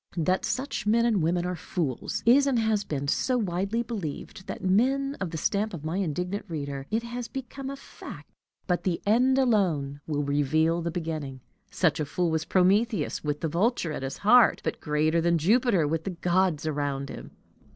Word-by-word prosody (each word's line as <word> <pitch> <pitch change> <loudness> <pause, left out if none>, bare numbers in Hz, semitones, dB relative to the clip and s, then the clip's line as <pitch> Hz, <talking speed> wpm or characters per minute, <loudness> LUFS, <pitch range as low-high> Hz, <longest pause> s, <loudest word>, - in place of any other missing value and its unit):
That 185 +3 +1
such 265 -5 -3
men 230 +2 +4
and 220 -6 +2
women 175 +2 +1
are 180 0 -2
fools, 160 -6 -3
is 270 +5 +6
and 265 -3 +2
has 220 -2 +1
been 140 -5 -3
so 255 - +1
widely 200 +2 -1
believed, 190 -4 -6
that, - - -5
to - - -2
men 270 +8 +2
of 190 - -1
the 160 - -5
stamp 200 +4 0
of 155 -2 -9
my 160 +4 -2
indignant 180 +2 -2
reader, 140 -4 -5
it 225 +2 0
has 240 0 -5
become 270 +2 -6
a 275 - -4
fact! 275 - -11 0.4
But 180 -2 0
the 175 -3 -1
end 250 +5 +4
alone 175 - +1
will 145 -2 -1
reveal 155 +4 +1
the 170 - -2
beginning. 155 -6 -4 0.3
Such 180 -5 +1
a 150 - 0
fool 165 +4 -1
was 160 0 -1
Prometheus, 195 - +2
with 150 -1 -2
the 165 - 0
vulture 175 - 0
at 150 - -4
his 135 +1 -4
heart 240 +3 +5
but - - -3
greater 155 +2 +1
than 170 0 +2
Jupiter 200 - +3
with 160 +1 -1
his 185 - -3
gods 180 -3 +1
around 140 -2 -2
him. - - -8
180 Hz, 195 wpm, -27 LUFS, 155-225 Hz, 0.4 s, is